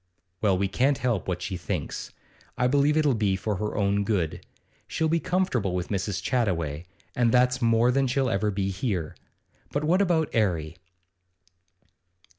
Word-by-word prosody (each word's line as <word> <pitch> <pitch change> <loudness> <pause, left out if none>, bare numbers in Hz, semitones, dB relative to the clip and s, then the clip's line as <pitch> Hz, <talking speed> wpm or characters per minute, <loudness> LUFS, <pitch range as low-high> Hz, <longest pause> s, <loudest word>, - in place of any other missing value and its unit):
'Well, 100 -4 +3
we 100 +1 +1
can't 135 +7 +1
help 120 -6 -1
what 90 -1 -2
she 95 -2 -3
thinks. 85 -3 -4 0.5
I 125 - +1
believe 145 +3 +3
it'll 150 -3 +3
be 105 -4 +1
for 100 +1 -2
her 105 +2 -3
own 100 0 +1
good. 95 -6 -1 0.4
She'll 160 - 0
be 165 +1 +2
comfortable 165 - 0
with 90 0 -3
Mrs. 100 -1 -2
Chattaway, 85 - -1 0.3
and 120 -2 +3
that's 125 +1 +3
more 115 +1 +4
than 135 +1 +2
she'll 130 +1 +1
ever 105 -1 0
be 100 -1 -1
here. 95 -5 -3 0.6
But 145 - -1
what 175 +6 +3
about 170 -5 +1
'Arry? 85 -7 0
110 Hz, 160 wpm, -26 LUFS, 95-135 Hz, 0.6 s, more